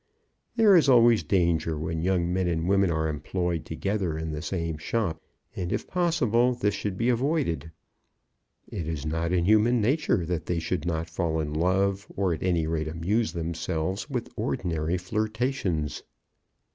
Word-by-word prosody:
There 220 -4 +6
is 160 -5 +5
always 120 -3 +6
danger 85 -1 +1
when 80 +1 -3
young 90 -1 +1
men 95 -1 +1
and 85 0 -1
women 100 -1 +3
are 80 -1 0
employed 85 +2 -2
together 95 -1 -2
in 80 0 -3
the 75 0 -4
same 85 -4 -3
shop, 85 -2 -2 0.3
and 90 -1 -3
if - - -1
possible 125 - +2
this 105 -4 0
should 100 -2 -3
be 115 +4 +1
avoided. 125 - 0 1.0
It 80 - -5
is 80 -3 -4
not 80 +2 -1
in 90 -2 +2
human 110 +4 +4
nature 115 - +1
that 85 -1 -3
they 90 - 0
should 80 0 -2
not 85 -1 -1
fall 80 -1 -1
in 75 -1 -3
love, 95 +4 +1
or 95 -3 +1
at 80 - -5
any 85 -3 +1
rate 80 -1 -1
amuse 95 +9 -1
themselves 85 - -3
with 125 -4 -4
ordinary 85 -1 -1
flirtations. 110 - -2
90 Hz, 160 wpm, -27 LUFS, 80-110 Hz, 1.0 s, There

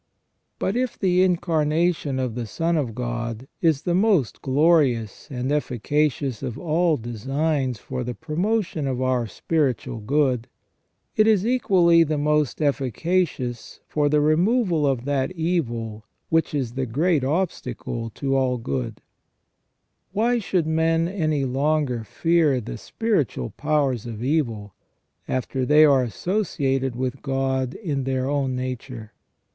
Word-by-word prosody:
But 195 - -1
if 250 -1 -1
the 185 -2 +2
Incarnation 165 -4 +1
of 130 -3 -1
the 120 -1 -4
Son 165 +7 0
of 130 -8 -1
God 120 0 -4
is 160 -5 +2
the 175 - 0
most 185 - +2
glorious 135 - +2
and 130 0 -3
efficacious 145 -2 0
of 115 - -4
all 165 -1 +1
designs 130 +3 -1
for 125 +4 -5
the 120 0 -4
promotion 165 0 -1
of 130 -2 -2
our 130 -2 +1
spiritual 130 - -1
good, 130 0 +1 0.7
it 215 0 +4
is 210 -3 +3
equally 185 -9 +4
the 155 -2 +1
most 150 0 +1
efficacious 140 - -1
for 145 -1 +1
the 150 0 +3
removal 170 - +2
Of 130 -3 0
that 140 +1 0
evil 120 -11 -2 0.3
which 165 -2 +1
is 130 -5 -1
the 130 0 -2
great 150 +5 +1
obstacle 130 - -2
to 135 -1 -1
all 130 -2 +1
good 70 - -4 1.1
Why 235 +4 +2
should 185 -6 0
men 165 +1 +2
any 155 -7 0
longer 135 -2 0
fear 160 +1 +2
the - - -7
spiritual 155 - -1
powers 140 -6 0
of 115 -1 -6
evil, 115 -9 -1 0.5
after 130 +1 -2
they 150 +4 +6
are 140 -3 +5
associated 135 - -1
with 130 +1 -3
God 135 -1 -1
in 145 - -3
their 130 -1 -1
own 140 -2 0
nature 125 -3 -6
140 Hz, 135 wpm, -23 LUFS, 125-165 Hz, 1.1 s, they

